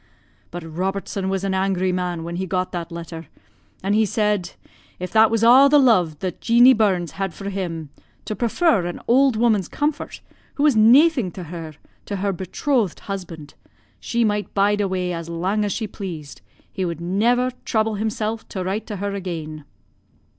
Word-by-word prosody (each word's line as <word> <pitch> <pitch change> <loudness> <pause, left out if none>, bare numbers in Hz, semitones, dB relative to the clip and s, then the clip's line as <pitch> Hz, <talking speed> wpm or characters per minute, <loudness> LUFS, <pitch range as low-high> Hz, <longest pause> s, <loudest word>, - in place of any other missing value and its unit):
But 175 0 -7
Robertson 190 +3 -3
was 195 0 -2
an 195 -1 -1
angry 190 -1 0
man 180 -2 -2
when 170 +1 -5
he 190 +1 -3
got 185 +1 -1
that 170 -1 -5
letter, 165 -1 -8 0.6
and 195 +1 +1
he 220 +1 +4
said, 210 -3 0 0.4
'If 180 0 -6
that 220 0 +5
was 225 -1 0
a' 255 +4 +8
the 295 - +6
lo'e 185 - +3
that 185 -3 -4
Jeanie 240 +3 +6
Burns 190 -7 +1
had 190 -4 -2
for 200 +3 -5
him, 165 -6 -4 0.3
to 215 - -3
prefer 235 - +1
an 175 - -5
auld 260 +1 +4
woman's 215 -5 +2
comfort, 300 0 -3 0.3
who 285 - -1
was 295 -5 +4
naething 250 - +5
to 185 - -7
her, 165 -2 -8 0.3
to 205 - -3
her 200 0 -1
betrothed 195 - -1
husband, 170 -7 -7 0.5
she 235 0 -1
might 210 -1 -1
bide 205 +1 +2
awa' 185 -2 -1
as 165 -1 -6
lang 185 +5 -1
as 205 - -1
she 220 - -2
pleased, 175 -8 -8 0.3
he 190 - -2
would 170 -3 -3
never 235 +9 +1
trouble 220 -1 0
himsel' 215 +1 -2
to 190 -3 -6
write 200 +4 -3
to 210 - -5
her 200 +1 -3
again.' 160 -6 -6
195 Hz, 175 wpm, -22 LUFS, 175-220 Hz, 0.6 s, a